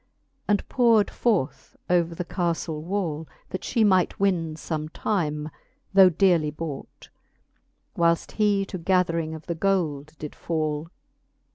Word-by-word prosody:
And 205 -1 +1
powred 230 -4 +3
forth 200 - -1
upon 170 -1 +2
the 180 - -4
caflle 170 -3 -2
wall, 165 -3 -2 0.2
That 185 - -4
fhe 230 -4 +2
might 185 -3 +2
win 175 -5 +1
fbm*e 155 -1 -4
time, 155 -6 -1 0.4
though 190 -1 +8
dearly 170 -3 +3
bought, 150 -2 -7 0.9
Whileft 170 0 +2
he 205 -2 +2
to 185 - -6
gathering 165 -3 +1
of 160 - -10
the 170 - -2
gold 160 -5 -1
did 150 - -7
fall. 155 -1 -2
170 Hz, 130 wpm, -25 LUFS, 155-195 Hz, 0.9 s, though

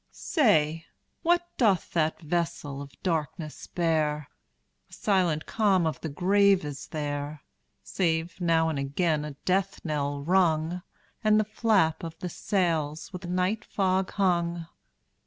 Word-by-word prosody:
Say, 165 - +1 0.3
what 345 +1 +2
doth 205 -8 +2
that 160 -2 +1
vessel 155 -4 -2
of 140 0 -11
darkness 160 -2 -3
bear? 155 -4 0 0.6
The - - -20
silent 180 -7 +1
calm 195 -6 +2
of 160 - -2
the 160 - -3
grave 195 +3 +3
is 145 -2 -6
there, 145 -1 -4 0.4
Save 165 -1 -1
now 165 -2 +3
and 155 -3 -1
again 150 +3 0
a 150 -2 -6
death 190 +1 0
knell 145 -2 -2
rung, 170 0 +2 0.4
And 215 0 +5
the - - +3
flap 215 -7 +2
of 165 -1 -6
the 180 - -5
sails 165 -4 -1
with 180 -1 -6
night 185 +5 0
fog 190 -2 0
hung. 170 -3 +1
170 Hz, 135 wpm, -27 LUFS, 155-190 Hz, 0.6 s, And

